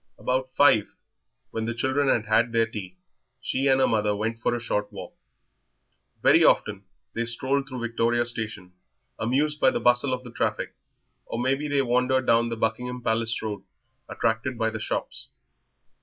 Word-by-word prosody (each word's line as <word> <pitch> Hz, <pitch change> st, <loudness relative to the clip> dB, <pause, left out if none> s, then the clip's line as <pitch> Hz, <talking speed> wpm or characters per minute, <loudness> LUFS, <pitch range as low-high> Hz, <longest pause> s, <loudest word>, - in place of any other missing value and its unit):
About 130 Hz, +1 st, -1 dB
five, 110 Hz, -8 st, +4 dB, 0.6 s
when 110 Hz, 0 st, -3 dB
the 115 Hz, 0 st, -3 dB
children 130 Hz, +3 st, 0 dB
had 115 Hz, -4 st, +2 dB
had 115 Hz, +2 st, +2 dB
their 115 Hz, 0 st, +3 dB
tea, 95 Hz, -5 st, -8 dB, 0.4 s
she 135 Hz, +2 st, -1 dB
and 135 Hz, 0 st, +4 dB
her 130 Hz, -, +4 dB
mother 105 Hz, -2 st, +1 dB
went 115 Hz, +2 st, -3 dB
for 120 Hz, -, 0 dB
a -, -, -3 dB
short 105 Hz, -3 st, -2 dB
walk. -, -, -9 dB, 1.1 s
Very -, -, +6 dB
often 100 Hz, -1 st, +2 dB, 0.3 s
they 115 Hz, -, -1 dB
strolled 135 Hz, +4 st, 0 dB
through 130 Hz, -2 st, -6 dB
Victoria 120 Hz, 0 st, +1 dB
Station, 110 Hz, -6 st, -4 dB, 0.5 s
amused 145 Hz, +6 st, 0 dB
by 130 Hz, -, +5 dB
the -, -, -1 dB
bustle 125 Hz, +2 st, +3 dB
of 125 Hz, 0 st, -2 dB
the 120 Hz, -, -10 dB
traffic, -, -, -2 dB, 0.5 s
or -, -, -4 dB
maybe 135 Hz, +4 st, 0 dB
they 140 Hz, -1 st, +1 dB
wandered 125 Hz, +1 st, +1 dB
down 115 Hz, 0 st, +3 dB
the 115 Hz, -, -4 dB
Buckingham 125 Hz, +3 st, -2 dB
Palace 115 Hz, 0 st, 0 dB
Road, 105 Hz, -2 st, -4 dB, 0.5 s
attracted 115 Hz, +2 st, -1 dB
by 110 Hz, 0 st, 0 dB
the 110 Hz, -, -5 dB
shops. -, -, -3 dB
120 Hz, 170 wpm, -25 LUFS, 110-130 Hz, 1.1 s, Very